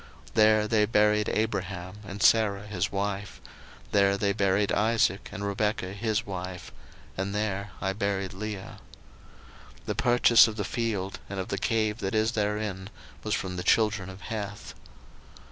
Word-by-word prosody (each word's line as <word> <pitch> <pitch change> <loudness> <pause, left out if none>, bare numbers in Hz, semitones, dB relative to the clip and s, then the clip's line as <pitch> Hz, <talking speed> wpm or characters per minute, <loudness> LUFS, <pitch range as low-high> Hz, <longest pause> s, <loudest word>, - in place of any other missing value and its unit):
01:049:031 - - -24
There 110 0 +4
they 105 -1 +3
buried 105 -1 +3
Abraham 95 -3 -2
and 100 +1 -4
Sarah 105 -3 +4
his 105 -2 -2
wife; 100 0 -3 0.5
there 100 -1 +3
they 100 0 +1
buried 100 0 +1
Isaac 110 -2 +1
and 100 - -5
Rebekah 100 -1 -1
his 110 +2 -1
wife; 90 -2 -6 0.4
and 95 +2 -3
there 100 -1 -2
I 95 0 -1
buried 100 -2 -2
Leah. 100 0 -6 1.0
01:049:032 - - -25
The - - -1
purchase 120 -1 +6
of 110 - -5
the 105 - -2
field 100 -2 -2
and 100 -1 -4
of 95 +4 -4
the 100 - -2
cave 110 0 0
that 95 +1 -2
is 110 +1 +2
therein 105 -3 -2 0.3
was - - -1
from 90 -1 -4
the 90 - -3
children 105 -1 +2
of 95 +1 -10
Heth. 105 -2 -6
100 Hz, 160 wpm, -27 LUFS, 95-110 Hz, 1.0 s, purchase